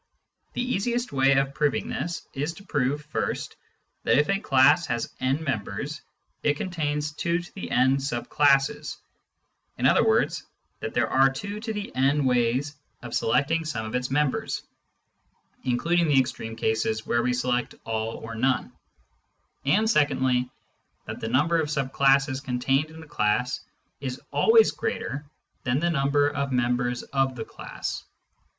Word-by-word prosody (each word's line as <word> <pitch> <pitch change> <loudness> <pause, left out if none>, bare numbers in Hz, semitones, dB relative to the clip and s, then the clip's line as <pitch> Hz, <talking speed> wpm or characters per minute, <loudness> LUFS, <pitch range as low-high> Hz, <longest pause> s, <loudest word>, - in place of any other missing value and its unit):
The 245 - -1
easiest 240 +1 -1
way 135 0 +4
of 135 0 +1
proving 145 -1 0
this 175 0 -4
is 145 +4 -2
to 200 - -13
prove, 145 -4 -1
first, 150 - -3 0.5
that - - +3
if 150 +4 +3
a 195 - +1
class 145 +1 +4
has 120 -3 -2
n 135 +5 0
members, 130 +3 -3 0.4
it 145 -1 +1
contains 150 -5 -2
2™ 150 -6 0
sub 130 -3 -3
classes 145 +1 +2 0.4
— - - -47
in - - -1
other - - +5
words, - - +2 0.4
that - - -5
there - - +2
are 135 +1 +4
2" 150 +10 -5
ways 225 - -9 0.2
Infinite - - -11
Cardinal 140 +3 +2
Numbers 125 +1 +2
85 145 - -20 0.3
of 120 - -7
selecting 150 +7 +2
some 115 -8 -3
of 110 - -6
its 125 0 -1
members 145 0 0 1.0
(including 165 +7 +2
the 140 -3 +5
extreme 115 -3 -2
cases 110 -1 0
where 120 - +1
we 125 +1 +1
select 125 0 -1
all 110 0 -2
or 115 0 -7
none); 130 +3 0 0.9
and 205 +11 +3
secondly, 130 - +2 0.6
that - - -6
the 110 - -3
number 155 +7 +3
of 150 - -3
sub 140 -3 -2
classes 135 0 +3
contained 135 +3 0
in 160 0 -11
a - - -15
class 125 -1 0 0.4
is 130 -1 -4
always 450 0 +5
greater 145 - -3 0.4
than 125 +2 +1
the 170 +2 +1
number 145 -1 +2
of 140 -1 -2
members 125 0 0
of 135 -1 0
the 110 -2 -5
class. - - -6
135 Hz, 155 wpm, -26 LUFS, 125-150 Hz, 1.0 s, other